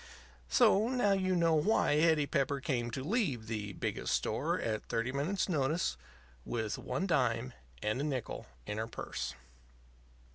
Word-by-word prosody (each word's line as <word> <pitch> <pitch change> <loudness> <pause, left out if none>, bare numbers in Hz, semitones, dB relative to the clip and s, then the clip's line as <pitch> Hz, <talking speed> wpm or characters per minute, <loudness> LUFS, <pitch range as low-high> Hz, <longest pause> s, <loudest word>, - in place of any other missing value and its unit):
So, 195 - +5
now 245 -6 +2
you 185 -1 +2
know 170 -2 +3
why 155 -2 +3
Hetty 160 -2 +4
Pepper 140 0 0
came 120 -3 -1
to 130 +3 -4
leave 155 - 0
the 105 -3 -4
Biggest 65 - -1
Store - - 0
at 110 -1 -2
thirty 115 +3 -1
minutes' 150 +9 0
notice, 155 -1 +1 0.5
with 110 - -2
one 185 - -2
dime 130 -7 +1 0.3
and 110 +5 0
a - - -1
nickel 135 -6 -3 0.2
in 105 - -3
her 110 - -2
purse. 65 - -5
140 Hz, 150 wpm, -33 LUFS, 115-170 Hz, 0.5 s, So